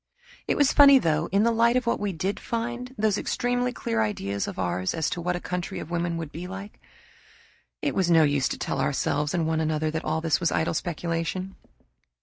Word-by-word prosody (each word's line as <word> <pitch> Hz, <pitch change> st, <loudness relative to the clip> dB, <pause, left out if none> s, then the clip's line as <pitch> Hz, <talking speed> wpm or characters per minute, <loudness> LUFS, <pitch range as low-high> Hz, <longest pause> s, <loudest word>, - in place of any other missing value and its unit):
It -, -, +1 dB
was 285 Hz, -2 st, +4 dB
funny 280 Hz, -2 st, +8 dB
though, 160 Hz, -7 st, +1 dB
in 200 Hz, +2 st, +3 dB
the 235 Hz, -, +3 dB
light 235 Hz, +1 st, +3 dB
of 255 Hz, -, -1 dB
what 235 Hz, -, 0 dB
we 205 Hz, -1 st, -1 dB
did 190 Hz, +4 st, -2 dB
find, 240 Hz, +2 st, -4 dB
those 215 Hz, -2 st, +1 dB
extremely 245 Hz, 0 st, 0 dB
clear 115 Hz, -, -2 dB
ideas 100 Hz, -2 st, -2 dB
of -, -, -6 dB
ours 90 Hz, 0 st, -1 dB
as 160 Hz, -2 st, -1 dB
to 175 Hz, -, -3 dB
what 180 Hz, +1 st, -1 dB
a -, -, -3 dB
country 180 Hz, 0 st, -4 dB
of 160 Hz, -, -7 dB
women 170 Hz, -1 st, -1 dB
would 160 Hz, -3 st, -5 dB
be 175 Hz, +3 st, -7 dB
like. 195 Hz, +2 st, -9 dB, 1.0 s
It -, -, 0 dB
was 185 Hz, -3 st, +1 dB
no 165 Hz, -2 st, +6 dB
use 145 Hz, -3 st, +2 dB
to -, -, -4 dB
tell 135 Hz, -, -2 dB
ourselves 145 Hz, +2 st, 0 dB
and 165 Hz, -2 st, +1 dB
one 160 Hz, 0 st, 0 dB
another 155 Hz, 0 st, 0 dB
that 160 Hz, 0 st, -3 dB
all 155 Hz, +1 st, -1 dB
this 160 Hz, -1 st, +1 dB
was 170 Hz, -, +1 dB
idle 160 Hz, -, 0 dB
speculation. 170 Hz, +3 st, -3 dB
170 Hz, 215 wpm, -26 LUFS, 155-210 Hz, 1.0 s, funny